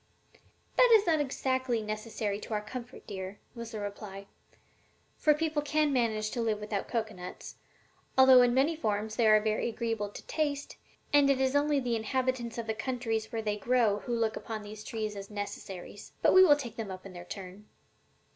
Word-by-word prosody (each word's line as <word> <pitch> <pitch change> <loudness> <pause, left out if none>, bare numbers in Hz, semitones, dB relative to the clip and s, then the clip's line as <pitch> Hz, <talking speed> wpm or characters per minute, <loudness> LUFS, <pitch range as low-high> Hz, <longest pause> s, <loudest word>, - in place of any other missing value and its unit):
"That - - +7
is 405 - -4
not 325 -3 +3
exactly 260 -3 0
necessary 215 -1 -3
to 215 - -4
our 210 - -1
comfort, 245 +3 -8
dear," 190 0 -6 0.2
was 235 -1 -7
the 220 -2 -6
reply, 200 -1 -6 0.9
"for 300 -1 +3
people 310 -1 0
can 300 0 +1
manage 220 -4 0
to 240 - -2
live 220 -2 0
without 210 -1 -3
cocoanuts, 220 -6 -5 0.6
although 260 -1 +9
in 245 0 +4
many 275 +6 +2
forms 215 -6 -2
they 230 - +3
are 215 0 +7
very 215 +2 0
agreeable 225 -3 -2
to - - -10
the - - -31
taste, 290 -2 -2 0.4
and 285 -1 +6
it 275 -1 +3
is 265 +1 +1
only 290 0 +3
the 245 -3 -1
inhabitants 240 +1 -1
of 235 - -3
the 220 - -1
countries 225 -2 -2
where 225 -2 -3
they 210 -1 -1
grow 225 -2 +2
who 240 +4 -3
look 225 -1 0
upon 220 -2 -5
these 215 +1 -9
trees 215 -2 -4
as 195 0 -7
necessaries; 205 -1 -7
but - - +5
we 375 - +9
will 300 -6 +7
take 245 -6 -7
them 220 -3 -4
up 185 0 -8
in 195 - -9
their 175 -1 -8
turn. 195 +2 -9
225 Hz, 195 wpm, -30 LUFS, 210-260 Hz, 0.9 s, although